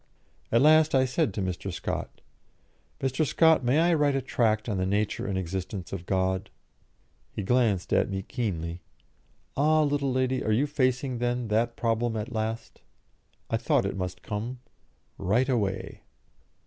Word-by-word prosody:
At 115 Hz, +3 st, +4 dB
last 155 Hz, 0 st, +5 dB
I 130 Hz, 0 st, +4 dB
said 130 Hz, -4 st, 0 dB
to 100 Hz, -, -1 dB
Mr. 95 Hz, +1 st, -3 dB
Scott, 85 Hz, -, -5 dB, 0.8 s
"Mr. 135 Hz, +3 st, +1 dB
Scott, 155 Hz, +3 st, +4 dB
may 125 Hz, +4 st, +2 dB
I 170 Hz, +1 st, +4 dB
write 145 Hz, -3 st, +2 dB
a 135 Hz, -, +1 dB
tract 110 Hz, -2 st, +1 dB
on 105 Hz, -4 st, -1 dB
the 95 Hz, -, 0 dB
nature 100 Hz, 0 st, -1 dB
and 100 Hz, -1 st, -1 dB
existence 95 Hz, 0 st, -4 dB
of 90 Hz, -2 st, -6 dB
God?" 95 Hz, +1 st, 0 dB, 0.8 s
He 105 Hz, -, -4 dB
glanced 110 Hz, -4 st, +1 dB
at -, -, +3 dB
me 95 Hz, -1 st, -3 dB
keenly. 90 Hz, -8 st, -3 dB, 0.7 s
"Ah, 155 Hz, +2 st, +3 dB
little 140 Hz, -2 st, 0 dB
lady, 130 Hz, 0 st, +1 dB
you 110 Hz, +1 st, +1 dB
are -, -, +2 dB
facing, 130 Hz, -3 st, 0 dB
then, 120 Hz, -1 st, -1 dB
that 115 Hz, +2 st, +1 dB
problem 115 Hz, 0 st, 0 dB
at 110 Hz, +2 st, -4 dB
last? 110 Hz, +1 st, -4 dB, 0.7 s
I -, -, +2 dB
thought -, -, +1 dB
it -, -, -2 dB
must 90 Hz, -1 st, -5 dB
come. 115 Hz, +4 st, -4 dB, 0.6 s
Write 120 Hz, +8 st, +1 dB
away." 100 Hz, -7 st, -1 dB
115 Hz, 160 wpm, -27 LUFS, 95-130 Hz, 0.8 s, last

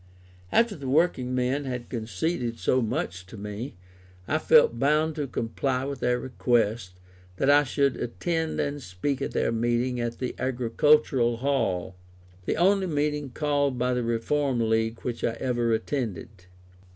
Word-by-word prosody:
After 230 Hz, -3 st, +3 dB
the 140 Hz, -5 st, -6 dB
working 130 Hz, -4 st, +2 dB
men 130 Hz, +3 st, 0 dB
had 125 Hz, -2 st, -4 dB
conceded 115 Hz, -, -2 dB
so 130 Hz, -, +2 dB
much 90 Hz, -5 st, -3 dB
to 110 Hz, -, -11 dB
me, 105 Hz, +5 st, -6 dB, 0.5 s
I -, -, +1 dB
felt 115 Hz, -, +5 dB
bound 150 Hz, +4 st, +2 dB
to 145 Hz, -2 st, -2 dB
comply 125 Hz, +2 st, -2 dB
with 140 Hz, 0 st, -4 dB
their 125 Hz, 0 st, +1 dB
request 115 Hz, -6 st, 0 dB, 0.4 s
that 135 Hz, +6 st, +3 dB
I 145 Hz, -1 st, +5 dB
would 140 Hz, -2 st, +3 dB
attend 160 Hz, +6 st, -2 dB
and 145 Hz, 0 st, -2 dB
speak 125 Hz, +7 st, -3 dB
at -, -, -3 dB
their -, -, +1 dB
meeting 120 Hz, +2 st, 0 dB
at 120 Hz, 0 st, -3 dB
the 125 Hz, -, -3 dB
Agricultural 130 Hz, 0 st, +2 dB
Hall; 115 Hz, -9 st, -1 dB, 0.5 s
the -, -, -1 dB
only 190 Hz, +2 st, +3 dB
meeting 150 Hz, -2 st, -1 dB
called 145 Hz, 0 st, 0 dB
by 125 Hz, +1 st, +1 dB
the 125 Hz, -, 0 dB
Reform 120 Hz, +1 st, 0 dB
League 110 Hz, +1 st, 0 dB
which 120 Hz, -2 st, -4 dB
I 115 Hz, -, +1 dB
ever 120 Hz, -3 st, 0 dB
attended. 115 Hz, -, -2 dB
125 Hz, 150 wpm, -26 LUFS, 115-145 Hz, 0.5 s, felt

